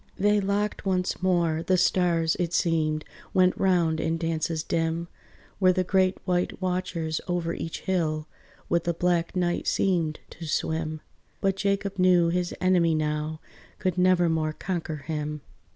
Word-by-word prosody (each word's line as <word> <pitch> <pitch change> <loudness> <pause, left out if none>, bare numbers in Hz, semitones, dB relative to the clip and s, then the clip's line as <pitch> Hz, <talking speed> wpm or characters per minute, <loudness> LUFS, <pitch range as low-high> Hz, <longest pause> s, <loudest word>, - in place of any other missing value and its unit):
They 205 +1 +3
locked 200 +1 -1
once 185 -2 -1
more; 170 -4 +2
the 185 +2 +2
stars, 170 -3 +2
it 175 -1 -1
seemed 155 -2 +1 0.3
Went 185 -1 +4
round 170 -4 +2
in 165 +1 0
dances 165 -1 -1
dim, 165 +1 -1 0.5
Where 185 -2 +5
the 185 - +1
great 185 0 +2
white 180 -1 0
watchers 180 -4 -2
over 175 -2 -1
each 165 - -5
hill, 155 -4 -1 0.4
With 170 0 +1
the 170 -1 0
black 175 0 0
night, 175 -1 0
seemed 170 -5 +1
to 165 - -8
swim; 155 0 -2 0.4
But 195 -1 +1
Jacob 200 0 -1
knew 180 -2 +5
his 175 0 -1
enemy 175 -3 +3
now, 155 0 -2 0.4
Could 185 -3 -1
nevermore 170 -4 +3
conquer 170 -2 -3
him. 150 0 -4
170 Hz, 145 wpm, -26 LUFS, 160-185 Hz, 0.5 s, Where